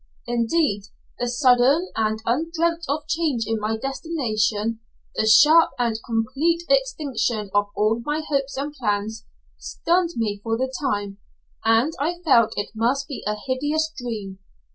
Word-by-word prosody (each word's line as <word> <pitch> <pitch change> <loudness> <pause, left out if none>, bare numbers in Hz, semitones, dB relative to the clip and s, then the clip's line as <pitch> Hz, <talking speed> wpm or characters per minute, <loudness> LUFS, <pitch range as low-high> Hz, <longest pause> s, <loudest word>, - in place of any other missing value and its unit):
Indeed, 235 -2 0 0.3
the 245 - -1
sudden 255 +6 +3
and 220 0 -1
undreamt 330 +6 0
of 295 +1 -2
change 315 -9 0
in 225 0 -1
my 215 +1 -1
destination, 230 -6 -1 0.3
the 220 - 0
sharp 305 +9 +7
and 235 -3 0
complete 270 +9 0
extinction 265 - 0
of 205 0 +2
all 220 +2 +1
my 300 +3 -2
hopes 275 -2 -1
and 290 +2 -3
plans, 220 -4 -2 0.3
stunned 345 0 0
me 210 -3 -1
for 225 +1 -1
the 260 +1 -2
time, 205 -7 -2 0.4
and 225 +7 +3
I 325 +5 0
felt 235 -7 +4
it 205 - -3
must 250 +5 0
be 280 - -6
a 210 - 0
hideous 295 +4 -1
dream. 210 -6 -6
245 Hz, 140 wpm, -23 LUFS, 220-300 Hz, 0.4 s, sharp